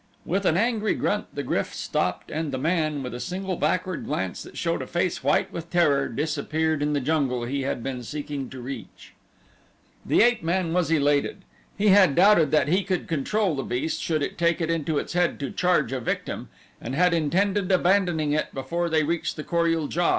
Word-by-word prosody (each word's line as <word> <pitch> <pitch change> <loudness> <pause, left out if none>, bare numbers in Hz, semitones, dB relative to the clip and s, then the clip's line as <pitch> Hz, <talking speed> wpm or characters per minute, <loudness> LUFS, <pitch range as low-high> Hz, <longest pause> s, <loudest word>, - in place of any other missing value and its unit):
With 195 +3 -1
an 160 - +3
angry 220 0 +1
grunt - - -1
the - - -3
GRYF - - -2
stopped 90 0 -2
and 155 -1 -2
the 130 - -2
man, 155 -1 0
with 125 - -5
a 120 - -5
single 185 +5 -3
backward 185 +1 -1
glance 95 -1 -2
that - - -11
showed - - -1
a - - -6
face - - -1
white - - +1
with 170 0 -6
terror, 150 -6 +3
disappeared 155 +3 -1
in 150 0 0
the 145 - +1
jungle 135 -4 0
he 135 +4 -2
had 130 -3 -3
been 130 -2 -4
seeking 145 0 -5
to 130 - -9
reach. 130 -1 -9 0.9
The - - +4
ape 240 -2 +3
man 170 0 0
was 180 -2 +1
elated. 145 -2 +1 0.3
He 210 +1 +3
had 190 -7 +6
doubted 180 -5 +5
that 150 -2 +3
he 185 +6 +2
could 185 -2 -2
control 180 +5 0
the 135 - -2
beast 135 +6 -2
should 155 -3 0
it - - -4
take 170 0 +2
it 165 -1 0
into 160 -2 -1
its - - -3
head 175 0 +1
to 140 - -3
charge 175 -9 +1
a 135 - -2
victim 120 - -3 0.3
and 125 +3 -4
had 180 +2 +3
intended 185 +5 +1
abandoning 180 -5 +2
it 155 - -1
before 170 +6 -2
they 160 -1 +2
reached 165 +2 -1
the 150 - -6
Kor 170 +1 +1
ul 165 -2 +1
JA. 175 +3 +1
160 Hz, 205 wpm, -25 LUFS, 140-180 Hz, 0.9 s, had